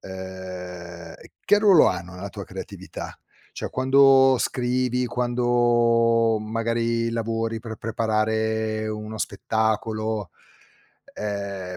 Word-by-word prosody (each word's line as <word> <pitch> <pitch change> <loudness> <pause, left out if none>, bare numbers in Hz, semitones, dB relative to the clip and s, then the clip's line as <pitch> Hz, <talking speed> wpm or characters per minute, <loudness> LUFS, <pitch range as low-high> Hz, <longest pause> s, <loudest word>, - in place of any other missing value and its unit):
ehm, 90 -2 -8 0.3
che 205 +1 +5
ruolo 200 -6 +6
hanno 90 +1 -5
nella 100 +2 -7
tua - - -7
creatività? - - -8 0.4
Cioè, - - -5
quando 135 0 +5
scrivi, 125 0 0
quando 120 -2 +2
magari 115 +1 -1
lavori 115 0 -2
per 115 -1 -7
preparare 110 0 -1
uno 110 0 -6
spettacolo, 110 -2 -1 0.8
ehm, 100 -3 -5
110 Hz, 90 wpm, -24 LUFS, 105-120 Hz, 0.8 s, ruolo